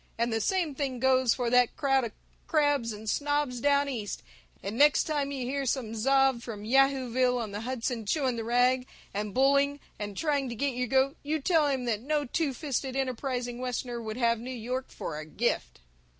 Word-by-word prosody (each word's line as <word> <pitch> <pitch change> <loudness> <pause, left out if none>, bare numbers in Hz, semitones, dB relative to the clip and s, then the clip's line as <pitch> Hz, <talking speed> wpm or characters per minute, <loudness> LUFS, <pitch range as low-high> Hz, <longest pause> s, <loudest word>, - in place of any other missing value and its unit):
And 235 0 0
the 225 - 0
same 355 - 0
thing 265 -3 -3
goes 260 -1 +3
for 245 -2 -1
that 250 -1 +4
crowd 270 -2 +2
of 225 - -5 0.4
crabs 290 -7 +2
and 215 +1 -8
snobs 290 0 0
Down 285 +2 +3
East, 220 - -4 0.4
and 200 +3 -4
next 290 +3 +5
time 290 -3 -1
you 265 -3 -3
hear 275 +2 -2
some 235 -3 -1
zob 270 +2 +3
from 215 -4 -7
Yahooville 255 -1 +3
on 220 -3 -4
the 205 +1 -4
Hudson 235 -2 -3
chewing 265 -1 +1
the 230 - -3
rag 250 +2 +2 0.3
and 205 +1 -3
bulling 280 +3 +3 0.2
and 205 -2 -5
trying 285 -4 0
to 235 - -5
get 275 +3 -1
your 250 +1 -1
goat, 265 +3 +2
you 310 +2 -1
tell 310 0 +3
him 265 -3 -1
that 220 -3 -1
no 295 +3 0
two 295 +3 0
fisted 265 -1 -3
enterprising 250 -2 -2
Westerner 245 -1 -3
would 220 0 -5
have 235 -2 +2
New 245 +3 -7
York 255 +1 -4
for 150 - -5
a 155 - -7
gift! 155 - -2
255 Hz, 195 wpm, -29 LUFS, 235-280 Hz, 0.4 s, next